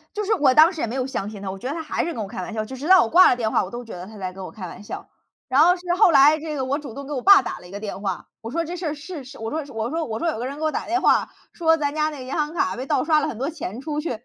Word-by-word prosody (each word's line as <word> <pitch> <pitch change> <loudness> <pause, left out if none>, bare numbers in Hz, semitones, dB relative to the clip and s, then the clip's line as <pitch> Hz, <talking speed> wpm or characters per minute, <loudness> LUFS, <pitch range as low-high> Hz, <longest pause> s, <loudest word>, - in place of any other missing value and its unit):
就 420 - -1
是 435 +2 +2
我 290 -9 +4
当 315 +5 +7
时 325 - -7
也 - - 0
没 230 - -5
有 260 -1 -1
相 235 -7 -4
信 210 -2 -9
他， 195 - -4
我 195 - -7
觉 220 - -8
得 285 - -3
他 325 - -4
还 310 - -2
是 340 - -3
跟 225 - -4
我 200 - -6
开 195 -3 -6
玩 205 - -6
笑， 215 -1 -2
直 260 +4 -8
直 285 +5 -5
到 375 0 +8
我 - - -3
挂 355 +9 +7
了 - - +2
电 225 -3 -1
话， - - +2
我 - - -8
都 245 0 -7
觉 230 - -10
得 180 0 -8
他 215 +2 -12
在 185 -2 -4
跟 190 0 -8
我 - - -7
开 200 -3 -8
玩 175 - -10
笑。 210 - -8 0.4
然 265 +3 +5
后 350 +2 +6
是 355 - -13
后 380 -1 +6
来 295 +1 +6
这 310 0 -5
个 265 - -1
我 275 +2 -1
主 290 -6 -8
动 280 +4 -8
给 295 - -6
我 260 -3 -2
爸 400 -1 +8
打 - - -5
了 180 - -14
一 - - -14
个 200 +1 -7
电 205 -2 -6
话， 190 -3 -3 0.2
我 225 - -6
说 335 +5 -1
这 345 +2 -5
事 350 -1 -5
儿 300 - -1
是 295 -1 -8
是 270 +2 -12
我 225 0 -4
说 315 - -2
我 225 +1 -2
说 325 +2 -1
我 220 -4 -4
说 335 - -1
有 310 - -2
个 235 - -4
人 275 +2 -5
给 - - -7
我 310 - +2
打 - - -4
电 360 +3 0
话， - - +3 0.2
说 325 -1 +3
咱 290 -2 -2
家 310 0 +1
那 290 - -8
银 255 +1 -7
行 300 -1 -1
卡 190 - 0
被 255 - -4
盗 265 - +1
刷 310 -1 +3
了 305 - -1
很 225 - -6
多 270 +3 -1
钱 255 - -6
出 295 +1 -4
去， 325 - -4
275 Hz, 410 characters per minute, -23 LUFS, 225-315 Hz, 0.4 s, 到